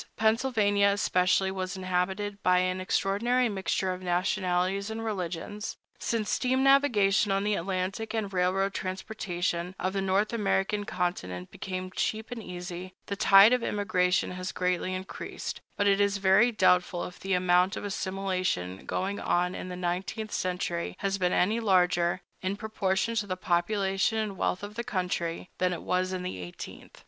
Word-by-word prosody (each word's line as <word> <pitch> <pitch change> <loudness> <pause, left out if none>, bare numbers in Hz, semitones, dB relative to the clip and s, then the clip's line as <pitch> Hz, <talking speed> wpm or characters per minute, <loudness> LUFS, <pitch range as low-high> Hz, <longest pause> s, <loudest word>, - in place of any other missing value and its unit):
Pennsylvania, 220 -3 +3
especially, 190 -1 +2
was 190 0 -4
inhabited 190 +3 -2
by 180 0 +4
an 185 0 0
extraordinary 230 +7 +1
mixture 190 -2 -1
of 180 - -8
nationalities 185 +2 0
and 225 +1 -4
religions. 200 +1 -4 0.2
Since 220 -3 -1
steam 260 +1 +1
navigation 215 -8 +4
on 195 0 +1
the 210 0 +1
Atlantic 195 +4 -2
and 205 -3 -2
railroad 190 +2 +1
transportation 185 -2 -3
on 185 - 0
the 195 0 -1
North 195 +3 +1
American 205 -1 0
continent 90 - -3
became 185 -1 -5
cheap 220 +4 -2
and 240 -2 -5
easy, 180 -1 -7
the 200 - -3
tide 195 +3 +7
of 250 - +2
immigration 200 -4 +1
has 185 +1 -4
greatly 180 0 -1
increased; 185 +1 -6 0.2
but 205 - +2
it 200 0 +4
is 200 0 +2
very 195 +5 +5
doubtful 180 -4 +2
if 180 - -10
the 195 0 -2
amount 180 +1 +3
of - - -5
assimilation 185 - -2
going 195 +2 -2
on 180 +1 +1
in 185 - -6
the 180 - -5
nineteenth 185 +5 -3
century 180 -2 -2
has 195 0 -1
been 180 -1 +2
any 210 +6 +2
larger, 180 -4 +2 0.2
in 190 +1 -1
proportion 210 0 -1
to 215 -3 -1
the 185 -1 -3
population 195 +4 +1
and 215 -3 -2
wealth 185 +1 -1
of 205 +1 -6
the 235 +2 -4
country, 180 -4 -2
than 185 0 +2
it 175 - -4
was 185 0 0
in 185 -1 -3
the 180 - -4
eighteenth. 90 -1 -9
190 Hz, 160 wpm, -28 LUFS, 180-205 Hz, 0.2 s, tide